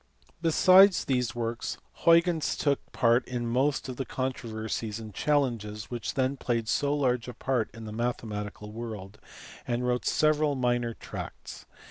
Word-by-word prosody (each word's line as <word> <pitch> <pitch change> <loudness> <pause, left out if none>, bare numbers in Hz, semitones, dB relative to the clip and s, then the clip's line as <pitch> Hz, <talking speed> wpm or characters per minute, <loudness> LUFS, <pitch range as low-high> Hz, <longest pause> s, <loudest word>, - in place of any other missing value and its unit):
Besides 185 +4 +6
these 125 -2 0
works 115 0 -3 0.3
Hnygeus 170 -1 +4
took 140 -2 0
part 120 +1 +3
in 120 -1 -3
most 130 +5 +1
of 130 -2 -6
the 135 - -1
controversies 115 -4 -4
and 110 -2 -9
challenges 115 -9 -1
which 120 -2 -4
then 130 +1 +1
played 115 -3 -1
so 140 +4 +1
large 125 -4 0
a 125 - -7
part 125 -5 -1
in 115 0 -10
the 105 - -7
mathematical 105 -3 -4
world, 105 -3 -7 0.5
and 120 +1 -1
wrote 125 0 0
several 155 -1 +2
minor 120 -2 0
tracts. - - -8
120 Hz, 145 wpm, -28 LUFS, 115-135 Hz, 0.5 s, Besides